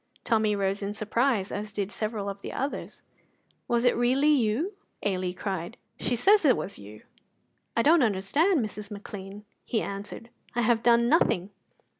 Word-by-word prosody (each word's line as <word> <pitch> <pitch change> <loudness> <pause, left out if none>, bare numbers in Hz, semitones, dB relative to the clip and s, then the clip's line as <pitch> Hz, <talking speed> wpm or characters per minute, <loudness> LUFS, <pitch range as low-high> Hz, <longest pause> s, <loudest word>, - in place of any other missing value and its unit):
Tommy 215 -3 +2
rose 195 0 -1
in 200 +1 -3
surprise, 215 -1 0
as 210 +1 -4
did 200 0 -3
several 215 -2 -3
of 200 0 -5
the - - -6
others. 275 +2 -4 0.6
"Was 235 0 +1
it 245 - +4
really 260 +5 +3
you?" 275 - +1 0.3
Ailie 185 -2 -1
cried. 190 +2 -4 0.2
"She 245 - 0
says 400 - +5
it 270 -5 +5
was 195 - -5
you!" 105 +1 -12 0.7
"I 230 - +4
don't 320 +4 +5
understand, 250 - +2
Mrs. 210 -1 -7
McLean," 205 0 -8 0.2
he 225 - -1
answered; 205 +4 -7 0.2
"I 240 - +2
have 230 0 +2
done 235 0 +4
nothing." 205 - +2
215 Hz, 160 wpm, -27 LUFS, 200-245 Hz, 0.7 s, says